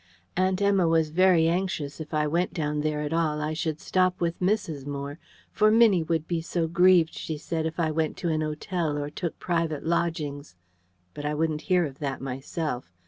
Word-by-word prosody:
Aunt 185 +1 +1
Emma 195 -3 +3
was 160 -2 +2
very 175 -1 +4
anxious, 165 -5 -1
if 155 - -8
I 155 -1 +1
went 170 +4 0
down 150 -2 -1
there 150 0 -1
at 150 +1 -3
all, 160 -2 +1
I 150 +1 -2
should 155 -1 -2
stop 185 0 +1
with 170 -1 -1
Mrs. 180 -8 -1
Moore: 140 +2 -5 0.3
for 215 0 +4
Minnie 220 -5 +5
would 160 -1 -1
be 170 -2 -1
so 165 0 -1
grieved, 175 -1 +4
she 155 - -5
said, 160 +1 -2
if 160 +2 -6
I 160 -2 +1
went 155 0 -1
to 175 - -2
an 155 -1 0
hotel 155 0 -2
or 145 0 -3
took 170 +1 -4
private 165 -4 -1
lodgings. 155 - -2 0.6
But 145 - -7
I 150 0 -1
wouldn't 155 0 0
hear 180 -2 +4
of 140 -2 -8
that 140 -3 -3
myself. 135 - -4
160 Hz, 195 wpm, -26 LUFS, 150-175 Hz, 0.6 s, Minnie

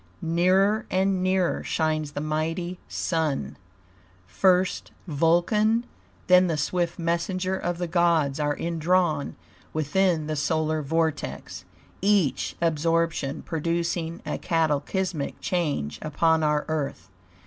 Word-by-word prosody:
Nearer 185 +6 +2
and 190 0 +1
nearer 185 -1 +1
shines 155 -2 -1
the 145 - -3
mighty 165 +4 -2
Sun; 150 - -2 0.7
first 180 - +2 0.2
Vulcan, 180 - +2 0.4
then 180 0 +6
the 160 -3 -1
swift 170 +3 -1
messenger 180 +2 -1
of 175 -2 -2
the 175 - -2
gods 165 -4 +2
are 145 -1 0
indrawn 170 -2 0 0.4
within 155 +2 +1
the 155 0 -2
solar 155 +1 0
vortex, 160 +2 -2 0.4
each 195 -7 +1
absorption 165 -2 0
producing 170 +1 -2
a - - -3
cataclysmic 165 +1 -1
change 150 - -2
upon 160 +1 +2
our 150 -1 +1
Earth. 145 - -3
165 Hz, 105 wpm, -25 LUFS, 155-180 Hz, 0.7 s, then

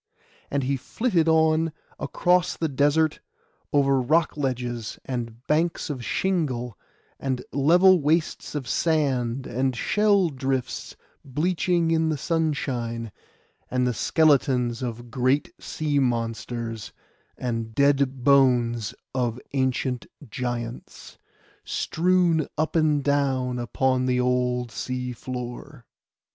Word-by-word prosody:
And 140 -1 -1
he 135 +1 0
flitted 170 - 0
on 160 0 +3 0.3
across 180 0 +1
the 160 - 0
desert: 145 +3 +2 0.5
over 140 -2 +3
rock 155 +6 +2
ledges, 125 -5 -3
and 120 -1 -5
banks 160 +1 0
of 130 -4 -5
shingle, 130 - -1 0.4
and 130 -2 -2
level 175 +6 +5
wastes 155 +1 0
of 135 -4 -3
sand, 135 -5 0
and 130 0 -1
shell 205 - +2
drifts 130 -2 -3 0.3
bleaching 170 +4 0
in 160 -1 +2
the 155 - 0
sunshine, 130 -8 -2 0.6
and 125 0 +1
the 125 - +1
skeletons 130 -5 +2
of 120 -1 -5
great 130 +3 +1
sea 150 -2 -1
monsters, 115 -2 -2 0.4
and 115 -3 -3
dead 140 -2 +2
bones 120 -5 +3 0.2
of 120 -2 -1
ancient 130 -2 -1 0.2
giants, 120 -1 -5 0.4
strewn 175 -2 +1
up 155 +2 -1
and 155 -3 +3
down 135 -3 +1
upon 130 +1 0
the 125 -1 +2
old 125 -1 0
sea 125 +3 -4
floor. 125 +2 -7
135 Hz, 110 wpm, -25 LUFS, 125-155 Hz, 0.6 s, level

